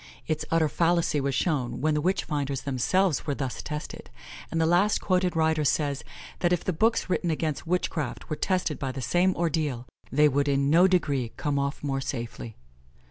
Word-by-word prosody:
Its 155 -1 -1
utter 165 -1 +3
fallacy 170 -2 +1
was 135 -1 -1
shown 145 -8 -1
when 155 +1 +1
the 150 - +1
witch 185 +5 +1
finders 140 -3 -2
themselves 150 +6 +1
were 145 - 0
thus 135 -3 -4
tested; 150 0 -6 0.4
and 165 - -1
the 160 - +3
last 175 +6 +3
quoted 180 -1 +1
writer 160 -1 +2
says, 145 -1 0 0.4
that 175 - +1
if 175 - +1
the 185 - -1
books 225 +8 +1
written 180 -1 0
against 155 -1 -2
witchcraft 160 -6 -2
were 155 - -2
tested 180 -4 -1
by 135 -2 -2
the 135 - -6
same 175 +8 +2
ordeal, 155 -7 -1 0.3
they 150 +3 +5
would 145 0 +1
in 140 0 +2
no 175 +4 +6
degree 140 -10 0
come 145 -2 -1
off 140 +1 -3
more 135 -2 -1
safely. 120 -3 -5
150 Hz, 190 wpm, -27 LUFS, 140-175 Hz, 0.4 s, no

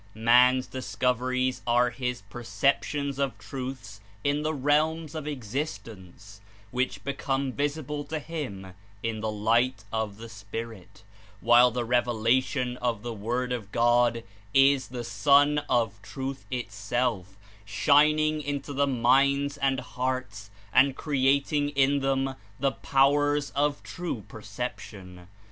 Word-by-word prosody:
Man's 125 +3 +5
discoveries 130 +2 -1
are 120 +1 +3
his 125 -3 -4
perceptions 140 +5 -1
of 135 -5 -1
truths 115 -3 -7 0.2
in 145 +1 +1
the 155 +1 -1
realms 155 +2 +1
of 155 -2 -5
existence, 100 - -6 0.3
which 125 +1 -2
become 140 -1 -2
vis 145 +1 -1
ible 150 -1 -6
to 160 - -2
him 130 - -6 0.3
in 115 -1 -2
the 110 - -1
light 115 +3 +1
of 110 -2 -2
the 115 +1 -9
spirit, 100 -2 -8 0.4
while 120 +2 +6
the 120 0 -3
revela 120 +1 +2
tion 125 -2 -3
of 120 -4 -2
the 120 -1 -4
Word 120 +4 -2
of 110 -5 -6
God 120 0 +3 0.3
is 135 -1 +5
the 125 -1 -6
Sun 145 +4 +4
of 115 -5 0
Truth 135 +5 -6
itself 100 -3 -2 0.3
shining 150 +8 +3
into 145 0 -4
the 140 +1 +1
minds 140 +3 +2
and 135 -2 +1
hearts 125 -6 -4 0.2
and 135 0 +5
creating 140 +1 +1
in 140 0 +2
them 135 0 0 0.3
the 135 +1 +2
powers 145 +2 +2
of 145 0 0
true 175 - -5
perception. 100 -4 -8
125 Hz, 125 wpm, -27 LUFS, 115-140 Hz, 0.4 s, while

